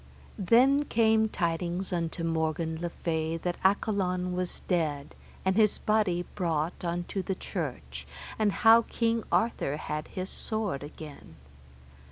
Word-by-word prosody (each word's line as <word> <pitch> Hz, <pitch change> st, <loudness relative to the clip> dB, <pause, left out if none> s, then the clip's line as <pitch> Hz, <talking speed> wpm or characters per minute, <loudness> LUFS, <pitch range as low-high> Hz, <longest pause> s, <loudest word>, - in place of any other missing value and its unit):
Then 260 Hz, +9 st, +4 dB
came 220 Hz, -3 st, +3 dB
tidings 175 Hz, +1 st, -2 dB
unto 165 Hz, -1 st, -2 dB
Morgan 160 Hz, 0 st, -1 dB
le 175 Hz, -, -2 dB
Fay 160 Hz, -1 st, -2 dB
that 175 Hz, +1 st, -3 dB
Accolon 185 Hz, -2 st, +1 dB
was 180 Hz, -1 st, -3 dB
dead, 155 Hz, -6 st, -1 dB, 0.3 s
and 190 Hz, 0 st, +2 dB
his 215 Hz, -1 st, +4 dB
body 200 Hz, -5 st, +1 dB
brought 165 Hz, -3 st, -1 dB
unto 175 Hz, +3 st, -2 dB
the 190 Hz, +1 st, -3 dB
church, -, -, -5 dB, 0.3 s
and 215 Hz, -2 st, +3 dB
how 225 Hz, +2 st, +6 dB
King 230 Hz, 0 st, -1 dB
Arthur 225 Hz, -10 st, +1 dB
had 150 Hz, 0 st, -4 dB
his 185 Hz, 0 st, -5 dB
sword 215 Hz, -, -2 dB
again. 145 Hz, -, -10 dB
180 Hz, 130 wpm, -29 LUFS, 165-215 Hz, 0.3 s, how